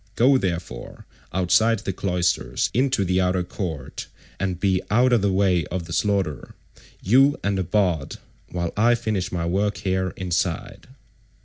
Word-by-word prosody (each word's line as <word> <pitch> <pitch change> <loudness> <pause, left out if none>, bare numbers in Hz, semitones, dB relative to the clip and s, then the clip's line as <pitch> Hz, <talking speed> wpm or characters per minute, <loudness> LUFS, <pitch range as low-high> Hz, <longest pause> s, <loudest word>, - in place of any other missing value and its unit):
Go, 130 +3 +4
therefore, 85 - -5 0.3
outside 110 +5 +3
the 95 - -4
cloisters 90 -1 0
into 125 -5 +1
the 90 +1 +1
outer 90 0 +1
court, 90 -4 -6 0.3
and 95 -2 -2
be 95 -1 +1
out 125 +4 +3
of 115 - +4
the 100 -1 +1
way 95 -3 +2
of 90 -2 -4
the 85 - -7
slaughter—you 100 - 0
and 100 0 0
the 95 - 0
bard—while 90 -1 -2
I 120 +3 +4
finish 110 -6 -2
my 85 -2 -2
work 100 +4 0
here 95 -1 -1
inside." 90 -1 -2
95 Hz, 140 wpm, -23 LUFS, 90-105 Hz, 0.3 s, Go